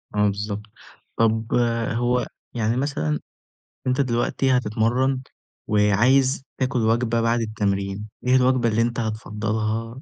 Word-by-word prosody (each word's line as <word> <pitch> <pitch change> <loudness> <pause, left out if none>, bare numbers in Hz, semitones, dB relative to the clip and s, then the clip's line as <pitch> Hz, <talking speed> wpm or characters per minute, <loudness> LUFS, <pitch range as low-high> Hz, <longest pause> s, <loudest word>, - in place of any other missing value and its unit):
آه 105 0 +3
بالضبط. 100 +1 -3 0.6
طَب 110 0 +2 0.5
هو 120 +2 +1 0.3
يعني 115 0 0
مثلًا 80 - -1 0.7
أنت 130 +2 +2
دلوقتي 130 +1 +1
هتتمرَّن 125 +4 +1 0.5
وعايز 115 +7 +3
تاكُل 130 -1 0
وجبة 115 +1 +1
بعد 115 +1 +2
التمرين، 100 -2 -2 0.2
إيه 125 - +5
الوجبة 125 -2 +3
اللي 110 +1 +1
أنت 120 +1 0
هتفضَّلها 110 +2 -3
115 Hz, 115 wpm, -23 LUFS, 105-125 Hz, 0.7 s, إيه